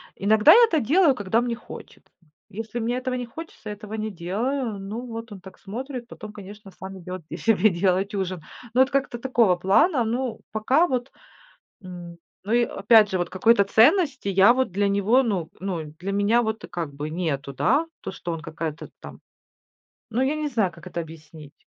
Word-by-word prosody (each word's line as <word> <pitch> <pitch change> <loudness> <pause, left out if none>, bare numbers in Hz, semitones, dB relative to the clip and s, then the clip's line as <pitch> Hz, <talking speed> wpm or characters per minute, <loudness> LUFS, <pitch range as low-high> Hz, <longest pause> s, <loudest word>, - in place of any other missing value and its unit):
Иногда 210 +2 +5
я 475 +2 +8
это 325 -8 +1
делаю, 295 - +3
когда 205 +3 0
мне 240 -1 -2
хочет, 240 - -12 0.2
м. 155 - -30 0.2
Если 225 +3 -5
мне 235 +2 -1
этого 255 0 -3
не 250 - -3
хочется, 240 -4 -10
этого 210 +1 -8
не 215 0 -3
делаю. 210 +6 -3
Ну, 215 +6 -6
вот 230 -1 -7
он 195 - -9
так 190 0 -13
смотрит, 245 +4 -7
потом, 215 -3 -10
конечно, 205 0 -11
сам 190 0 -9
идёт 180 +1 -7 0.2
себе 215 -1 +3
делать 190 +2 0
ужин. 185 -3 -3 0.3
Но 255 - +4
это 270 - -5
как-то 275 -3 -1
такого 235 -7 +2
плана. 235 - +3
Ну 235 0 -2
пока 260 +11 +2
вот, 250 0 -2 0.7
м, 175 -2 -9 0.3
ну 215 - -3
и 240 0 +4
опять 215 0 +4
же, 185 - -1
вот 175 - -1
какой-то 200 +2 +4
ценности 270 - +3
я 195 +4 +6
вот 260 -8 0
для 200 +1 +1
него, 205 +6 +3
ну, 185 -9 -2
ну, 180 -5 -3 0.2
для 195 +2 -3
меня 205 +4 +3
вот 220 -1 -3
как 170 -5 -4
бы 150 +2 -5
нету, 155 -5 -3
да? 285 - +2 0.2
То - - -6
что 175 -2 -6
он 165 - -4
какая-то 160 0 -6
там, - - -11 0.9
ну 235 +3 -1
я 270 +3 +1
не 305 -1 -2
знаю, 215 -9 0
как 170 +1 -15
это 175 - -6
объяснить. 155 -2 -11
210 Hz, 190 wpm, -24 LUFS, 185-245 Hz, 0.9 s, я